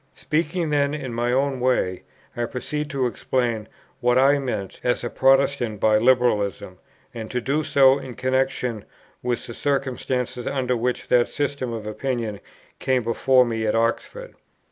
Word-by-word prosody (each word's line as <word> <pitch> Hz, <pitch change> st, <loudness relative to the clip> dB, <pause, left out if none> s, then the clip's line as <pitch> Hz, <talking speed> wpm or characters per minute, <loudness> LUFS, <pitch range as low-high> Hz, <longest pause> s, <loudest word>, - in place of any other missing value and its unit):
Speaking 160 Hz, +1 st, -1 dB
then 145 Hz, 0 st, +1 dB
in 135 Hz, -5 st, -5 dB
my 120 Hz, +1 st, 0 dB
own 135 Hz, +1 st, +1 dB
way, 125 Hz, -8 st, +1 dB, 0.3 s
I 120 Hz, -, -1 dB
proceed 150 Hz, +5 st, -4 dB
to 135 Hz, -4 st, -1 dB
explain 120 Hz, -3 st, -1 dB, 0.3 s
what 125 Hz, +1 st, +2 dB
I 140 Hz, +2 st, +5 dB
meant 115 Hz, -8 st, -4 dB
as 125 Hz, 0 st, 0 dB
a 120 Hz, -, -3 dB
Protestant 135 Hz, -5 st, +2 dB
by 110 Hz, 0 st, +4 dB
Liberalism, 110 Hz, -6 st, +1 dB, 0.3 s
and 110 Hz, -2 st, -6 dB
to 125 Hz, -, -1 dB
do 140 Hz, +6 st, 0 dB
so 135 Hz, -1 st, +5 dB
in 130 Hz, -3 st, -8 dB
connexion 130 Hz, -4 st, -1 dB, 0.4 s
with 120 Hz, -1 st, -2 dB
the 120 Hz, -, -7 dB
circumstances 130 Hz, -2 st, -2 dB
under 125 Hz, -2 st, 0 dB
which 125 Hz, +1 st, -2 dB
that 120 Hz, -1 st, +4 dB
system 140 Hz, -4 st, -2 dB
of 110 Hz, -2 st, -5 dB
opinion 110 Hz, -2 st, -3 dB, 0.4 s
came 130 Hz, -2 st, +1 dB
before 125 Hz, +3 st, +3 dB
me 115 Hz, -2 st, -2 dB
at 105 Hz, -, +1 dB
Oxford. 120 Hz, -, -1 dB
125 Hz, 155 wpm, -23 LUFS, 115-135 Hz, 0.4 s, I